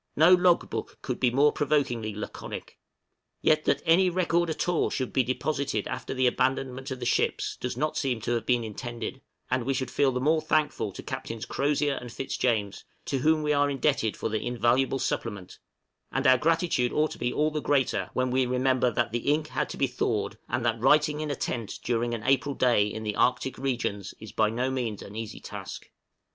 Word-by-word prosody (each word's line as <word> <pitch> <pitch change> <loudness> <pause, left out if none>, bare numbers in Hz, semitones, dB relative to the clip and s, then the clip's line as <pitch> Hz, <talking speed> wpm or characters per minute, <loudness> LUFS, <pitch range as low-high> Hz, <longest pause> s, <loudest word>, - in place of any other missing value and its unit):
No 160 +5 +7
log 180 -1 +4
book - - -5
could - - -3
be 125 - +3
more 140 +4 +4
provokingly 135 -8 0
laconic. 105 - -7 0.6
Yet, 155 0 +3
that - - +1
any 180 +3 +5
record 175 -1 +1
at 160 - -2
all 175 -2 +2
should 130 -2 -3
be 130 - +4
deposited 140 +3 -1
after - - -4
the 130 0 +2
abandonment 130 +1 0
of 130 -1 -5
the 120 - -4
ships, - - 0
does 125 -1 -4
not 155 +3 -1
seem 130 -5 0
to 120 - -2
have 120 -1 0
been 125 -2 +1
intended; 120 +3 -6 0.3
and 125 -1 +1
we 135 +2 0
should 130 -1 -2
feel 140 -2 +3
the 125 - -2
more 155 +4 +2
thankful 155 -1 0
to - - -8
Captains 115 -1 -5
Crozier 145 0 0
and 120 -1 -8
Fitzjames, 115 -4 -1 0.2
to 135 - -1
whom 155 +3 +3
we 150 0 +2
are 145 0 +3
indebted 135 -5 0
for - - -2
the 110 -1 -2
invaluable 125 +2 +1
supplement; 100 -7 -4 0.5
and 135 +2 -1
our 130 -1 +6
gratitude 160 -5 +1
ought 155 +1 +1
to - - -9
be 120 - 0
all 155 +3 +1
the 150 0 -2
greater 120 -11 +1
when 130 0 0
we 130 0 +2
remember 125 0 +2
that 120 -1 -1
the 120 +5 0
ink 150 +1 0
had 150 - -2
to - - -6
be 140 - +3
thawed, 110 -4 -2
and 120 0 -1
that 115 -1 0
writing 150 +3 +4
in 155 - -3
a 145 - -1
tent 115 -4 -3
during 120 0 0
an 110 - -7
April 135 +1 +2
day 120 -5 +3
in 110 +1 -5
the 105 -1 -2
Arctic 125 +1 +1
regions 120 -7 -2
is 110 - -9
by 110 -1 +2
no 125 +4 -1
means 120 -6 -3
an 100 - -11
easy 110 -1 -6
task. - - -8
130 Hz, 205 wpm, -27 LUFS, 120-145 Hz, 0.6 s, No